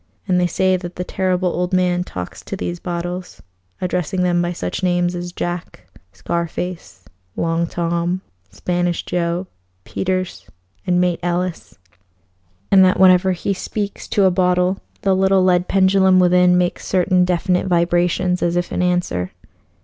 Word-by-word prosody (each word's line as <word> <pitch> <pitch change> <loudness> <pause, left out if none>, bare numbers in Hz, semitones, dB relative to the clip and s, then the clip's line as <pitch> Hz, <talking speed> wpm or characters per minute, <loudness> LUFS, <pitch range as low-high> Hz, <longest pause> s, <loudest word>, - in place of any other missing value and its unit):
And 180 -1 +2
they 180 - +2
say 185 +2 +1
that 175 -1 -8
the 180 - -3
Terrible 185 -1 0
Old 180 +1 -2
Man 180 -1 +2
talks 90 - -7
to - - -4
these 90 -1 -4
bottles, 175 +1 -5 0.4
addressing 180 0 -1
them 175 -1 +2
by 175 0 -1
such 90 - -4
names 175 -1 +1
as 175 0 -5
Jack, 175 - -5 0.3
Scar 170 - -3
Face, 165 - -7 0.3
Long 165 0 0
Tom, 170 +2 -1 0.3
Spanish 175 -1 -2
Joe, 175 +1 -1 0.4
Peters, 185 -1 -3 0.4
and 180 0 +2
Mate 180 -1 +1
Ellis, 175 - -3 0.9
and 190 -1 +7
that 185 0 +3
whenever 185 0 +5
he 190 +3 -2
speaks 205 +2 -5
to 205 - +1
a 190 - +5
bottle 180 +1 +1 0.2
the 195 -2 +3
little 190 0 +3
lead 180 -1 +2
pendulum 190 -1 +4
within 180 0 +4
makes 180 -1 -1
certain 185 0 +2
definite 180 +1 0
vibrations 175 +1 +1
as 175 0 +1
if 175 0 -1
in - - -1
answer. 175 - 0
180 Hz, 150 wpm, -19 LUFS, 175-185 Hz, 0.9 s, and